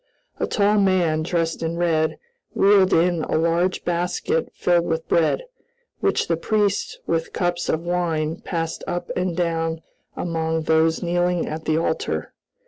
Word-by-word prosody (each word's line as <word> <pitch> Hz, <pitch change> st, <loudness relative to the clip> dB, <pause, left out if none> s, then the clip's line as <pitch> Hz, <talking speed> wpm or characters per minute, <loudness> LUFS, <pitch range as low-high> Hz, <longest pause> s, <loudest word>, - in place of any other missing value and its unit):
A -, -, 0 dB
tall 205 Hz, 0 st, +2 dB
man, 180 Hz, -5 st, +2 dB
dressed 165 Hz, 0 st, -1 dB
in 165 Hz, +1 st, -2 dB
red, 160 Hz, -2 st, +1 dB, 0.4 s
wheeled 195 Hz, -1 st, +5 dB
in 170 Hz, -1 st, +3 dB
a -, -, 0 dB
large 170 Hz, +3 st, +1 dB
basket 180 Hz, -, -1 dB
filled 175 Hz, -1 st, +2 dB
with 160 Hz, 0 st, -2 dB
bread, 165 Hz, -, +2 dB, 0.6 s
which -, -, +1 dB
the 165 Hz, -, +1 dB
priests, 205 Hz, +2 st, 0 dB
with 165 Hz, -1 st, -1 dB
cups 175 Hz, -1 st, -1 dB
of 160 Hz, -, +1 dB
wine, 170 Hz, -2 st, -1 dB
passed 165 Hz, -2 st, -4 dB
up 175 Hz, 0 st, -3 dB
and 180 Hz, -2 st, -1 dB
down 165 Hz, -2 st, -1 dB, 0.3 s
among 160 Hz, -1 st, -1 dB
those 160 Hz, +1 st, +2 dB
kneeling 175 Hz, 0 st, +1 dB
at 155 Hz, +1 st, -5 dB
the 155 Hz, -, +1 dB
altar. 160 Hz, -1 st, -2 dB
170 Hz, 145 wpm, -22 LUFS, 160-180 Hz, 0.6 s, wheeled